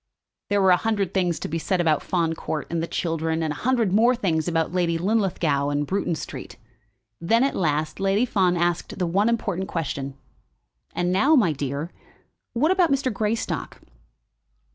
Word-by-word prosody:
There 205 0 +2
were 190 - +5
a 180 - +6
hundred 200 -3 -1
things 180 -3 0
to - - -3
be 165 - -3
said 185 +3 -1
about 160 -4 +2
Fawn 170 -3 0
Court 155 -2 -4
and 170 -1 -1
the 165 - -2
children, 165 -1 -1
and 155 -2 -1
a - - -9
hundred 235 -6 +1
more 235 +4 +4
things 170 -9 0
about 165 -1 0
Lady 170 -2 +1
Linlithgow 175 -7 +1
and 145 0 0
Bruton 185 -1 -1
Street. 135 -3 -8 0.6
Then, 230 +9 +2
at 275 - 0
last, 155 -1 -1
Lady 195 +4 +2
Fawn 185 -6 +1
asked 175 0 -1
the 185 - 0
one 195 +6 +2
important 190 -5 -1
question. 140 -6 -4 0.8
"And 175 0 0
now, 280 +12 +4
my 215 - +4
dear, 145 +3 -4 0.6
what 300 +9 +2
about 365 -5 +3
Mr. 265 -3 +1
Greystock?" 215 +2 -2
180 Hz, 175 wpm, -24 LUFS, 160-210 Hz, 0.8 s, a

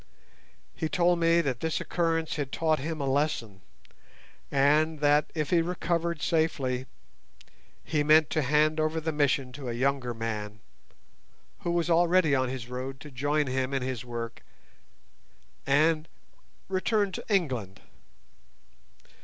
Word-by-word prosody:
He 160 - -2
told 175 +1 +2
me 165 0 +4
that 135 -6 -2
this 160 +2 -1
occurrence 165 -2 -1
had 145 -3 -3
taught 160 -1 +1
him 155 +3 -4
a 140 - -1
lesson, 135 -8 -1 0.9
and 150 +3 +3
that, 145 +1 +3
if 155 -3 -2
he 170 -2 +4
recovered 170 -1 -2
safely, 135 -6 0 1.0
he 155 -2 0
meant 155 +1 +5
to 155 - +1
hand 150 +3 +2
over 155 +1 0
the 160 0 -2
Mission 140 -3 +1
to 130 -1 -7
a - - -2
younger 125 -1 0
man, 105 -2 -4 1.0
who - - -4
was 170 -1 +1
already 170 -2 +4
on 130 -2 +1
his 125 -2 -5
road 130 +2 -6
to 150 - -10
join 145 +4 0
him 130 +1 -1
in 135 - -1
his 125 -2 -3
work, 120 -1 -6 1.3
and 155 +3 +3 0.6
return 200 +2 0
to - - -6
England. 125 - -1
150 Hz, 135 wpm, -28 LUFS, 130-165 Hz, 1.3 s, meant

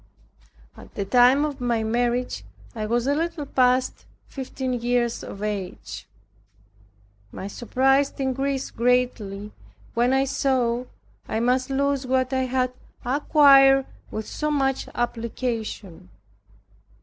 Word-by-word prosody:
At - - -15
the 200 - -2
time 250 +6 +5
of 285 -3 -5
my 235 -2 0
marriage 240 +2 -1 0.3
I 215 -3 -4
was 235 +2 0
a 280 - +2
little 330 0 -2
past 255 -1 +1 0.2
fifteen 260 -1 -4
years 240 -1 0
of 200 - -8
age. 200 -4 -5 1.2
My - - -7
surprise 270 +6 +1
increased 270 0 -2
greatly, 230 -5 0 0.4
when 240 +2 +2
I 265 +1 +3
saw 255 -3 0 0.4
I 220 - -1
must 255 +3 +1
lose 275 -1 0
what 260 0 +1
I 260 0 +1
had 255 0 0 0.3
acquired 270 0 +6 0.2
with 215 0 -5
so 300 - -2
much 270 -3 0
application. 230 - -4
255 Hz, 115 wpm, -24 LUFS, 235-270 Hz, 1.2 s, acquired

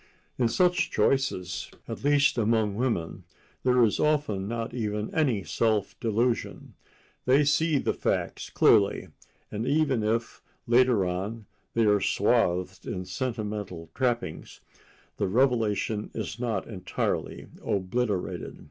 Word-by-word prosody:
In 120 - +4
such 180 +8 +2
choices, 105 - 0 0.2
at - - -6
least 145 0 +4
among 110 -2 +1
women, 100 -6 -2 0.4
there 125 -1 +4
is 110 - +2
often 145 -11 +1
not 115 +1 -3
even 105 -3 -3
any 130 -11 +1
self 110 -3 0
delusion. 115 +2 -1 0.5
They 135 +3 +5
see 150 +1 +2
the - - 0
facts - - -2
clearly, - - +3 0.4
and 110 +3 -3
even 140 -4 +2
if, 110 +2 -1 0.2
later 120 -4 +4
on, 100 +5 -3 0.3
they 115 -1 +3
are 105 -1 +4
swathed 95 -4 +1
in 90 -1 -4
sentimental 105 -5 -4
trappings, 120 -9 -2 0.6
the - - 0
revelation 110 -2 +1
is 110 - -4
not 115 -6 -1
entirely 95 -5 -3 0.2
obliterated. 100 0 -2
115 Hz, 120 wpm, -27 LUFS, 100-125 Hz, 0.6 s, They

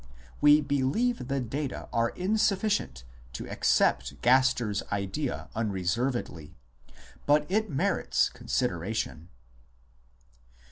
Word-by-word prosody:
We 150 +1 +7
believe 145 - 0
the 135 0 -1
data 135 +3 -4
are 115 0 +2
insufficient 200 - 0 0.3
to - - -6
accept - - +1
Gaster 125 -3 +3
s 100 - -1
idea 100 +8 -3
unreservedly, 105 - -2 0.7
but 150 +1 +4
it 215 +2 +1
merits 135 -3 +1
con - - -15
sideration. 90 -6 -2
130 Hz, 95 wpm, -28 LUFS, 105-150 Hz, 0.7 s, We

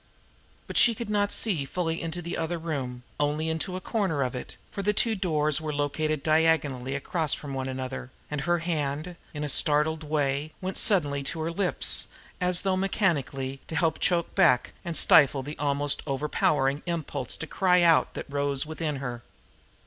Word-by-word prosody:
But - - -4
she 235 -2 +6
could 220 -1 -5
not 205 -1 +1
see 185 -11 +1
fully 165 +2 -2
into 165 +1 -4
the 170 +2 -4
other 165 +1 -2
room, 135 -7 -4 0.2
only 150 +2 0
into 160 +3 -2
a - - -3
corner 185 -8 0
of 125 - -2
it, 125 - -7
for 200 - -4
the 210 +2 +1
two 225 +2 +2
doors 155 -6 +1
were 155 -1 -3
located 150 +1 -1
diagonally 155 -5 +2
across 155 +2 0
from 145 -2 -7
one 130 0 -3
another, 130 -1 -5 0.2
and 150 -2 -2
her 175 +4 +2
hand, 160 0 -2 0.2
in 150 -1 -5
a - - -1
startled 150 +2 +2
way, 145 0 -1
went 190 +1 -3
suddenly 145 -9 +3
to 160 +4 -3
her 165 +1 -1
lips, 180 +1 0 0.3
as 180 0 +2
though 190 -1 +1
mechanically 145 - 0
to 160 - -5
help 160 -1 +1
choke 170 -2 +1
back 125 -1 +3
and 170 -1 -4
stifle 140 -3 +5
the 145 +3 -6
almost 145 0 +1
overpowering 140 0 +1
impulse 150 -6 -2
to - - -4
cry 180 +1 +3
out 165 -1 +4
that - - -4
arose 140 -1 0
within 155 -1 -3
her. 125 -3 -5
155 Hz, 180 wpm, -27 LUFS, 140-175 Hz, 0.3 s, she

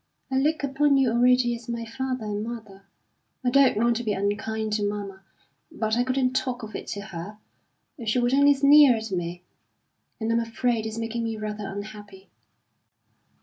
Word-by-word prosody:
I 265 - +2
look 305 +2 +1
upon 280 +1 +2
you 260 -3 +3
already 245 0 +3
as 235 0 -11
my 235 -1 -3
father 255 0 -4
and 210 0 -3
mother. 215 -4 -8 0.6
I 245 - +3
don't 275 -4 +5
want 235 +1 +2
to 240 - -4
be 215 -2 0
unkind 215 +2 -2
to 210 -1 0
mamma, 205 -2 -4 0.5
but 220 0 -1
I 245 - +2
couldn't 255 0 0
talk 250 -2 -2
of 215 - -8
it - - -6
to 200 - -4
her; 200 +1 -8 0.7
she 215 - +1
would 245 +1 +1
only 285 +1 +5
sneer 280 -1 +7
at 220 -1 -5
me. 175 -1 -4 0.8
And 225 0 -1
I'm 230 - +3
afraid 230 -1 -1
it's 220 0 -6
making 230 +1 -3
me 225 -1 -3
rather 210 -1 -5
unhappy." 205 -1 -9
225 Hz, 180 wpm, -25 LUFS, 210-250 Hz, 0.8 s, sneer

